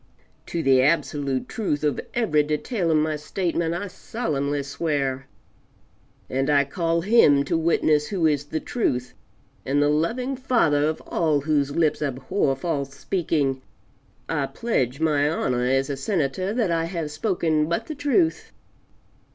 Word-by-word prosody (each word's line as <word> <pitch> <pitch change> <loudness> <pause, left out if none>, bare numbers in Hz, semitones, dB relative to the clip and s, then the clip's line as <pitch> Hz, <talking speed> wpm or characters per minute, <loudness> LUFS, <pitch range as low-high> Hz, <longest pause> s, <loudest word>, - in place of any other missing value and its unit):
To 170 -1 -2
the 130 -1 +5
absolute 140 -2 0
truth 155 -10 -2
of 150 -2 0
every 180 -11 +3
detail 165 - -1
of 160 - +4
my 155 0 0
statement 170 +1 -2
I 180 - -3
solemnly 145 - -3
swear, 140 -2 -2 1.0
and 135 +2 -1
I 145 -1 +4
call 165 +3 -1
Him 165 -9 +5
to 140 - -1
witness 155 -2 +2
who 185 -5 0
is 145 -2 +1
the 155 +2 -3
Truth 125 - -2 0.5
and 140 +2 0
the 145 0 +3
loving 230 - 0
Father 230 - +2
of 155 0 -2
all 155 -4 0
whose 145 -1 0
lips 160 -3 +1
abhor 135 +2 0
false 140 -2 -3
speaking; 150 -7 -1 0.7
I 145 -4 -1
pledge 135 - -1
my 150 -2 +2
honor 125 -5 0
as 135 +1 +1
a 140 - -2
Senator, 165 +4 -1
that 220 -5 0
I 165 0 +1
have 165 -3 -4
spoken 155 -3 0
but 170 - -1
the 310 - -5
truth. 295 +4 0
155 Hz, 150 wpm, -24 LUFS, 140-170 Hz, 1.0 s, the